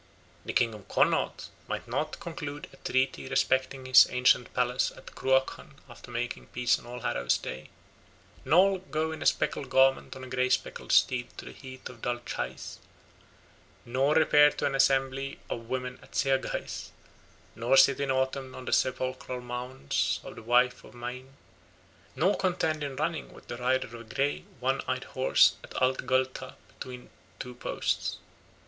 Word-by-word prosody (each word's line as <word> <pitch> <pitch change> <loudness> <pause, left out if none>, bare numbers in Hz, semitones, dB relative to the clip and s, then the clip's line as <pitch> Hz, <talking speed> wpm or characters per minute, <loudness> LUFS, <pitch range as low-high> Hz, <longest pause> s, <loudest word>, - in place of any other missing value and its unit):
The - - -4
king 115 -2 +2
of 105 -3 -12
Connaught - - +1 0.2
might - - -4
not 155 0 -2
conclude 160 -3 -6
a - - -15
treaty 130 0 0
respecting 130 0 +1
his 130 0 +8
ancient 125 -1 +3
palace 125 0 +1
of - - -15
Cruachan 130 +1 0
after 120 0 -13
making 120 0 -4
peace 125 +1 +1
on - - -14
All 125 0 -7
Hallows 60 - +1
Day, 65 - -7 0.7
nor 190 +4 +4
go 160 -3 -2
in 160 - -7
a - - +2
speckled 140 - 0
garment 135 0 +3
on 130 - -9
a - - -7
grey 130 0 0
speckled - - -1
steed 125 -2 +3
to - - -8
the - - -8
heath 130 -1 -10
of 120 -3 -12
Dal 120 0 -1
Chais, - - -5 1.1
nor 135 +5 +1
repair 150 -2 +6
to - - -3
an 140 - 0
assembly 135 0 +1
of 115 0 -5
women 125 0 -3
at - - -16
Seaghais, 135 -1 -1 0.7
nor 120 +4 +2
sit 135 0 +6
in 140 -1 -1
autumn 130 0 -1
on 130 - -8
the - - -2
sepulchral 130 0 -1
mounds 125 - -2
of - - -8
the - - -9
wife 125 +2 +2
of - - -15
Maine, 125 +2 -7 0.8
nor 185 +5 +3
contend 160 -5 0
in 140 -2 -4
running 155 +3 -2
with - - -16
the 120 - -4
rider 130 +1 +1
of 115 - -14
a 120 0 -8
grey 140 +1 0
one 135 +2 0
eyed 130 0 -1
horse 130 0 +3
at - - -12
Ath 130 0 +1
Gallta 130 0 0
between 125 -1 -10 0.3
two 125 - -7
posts. 120 - -2
130 Hz, 165 wpm, -29 LUFS, 125-135 Hz, 1.1 s, his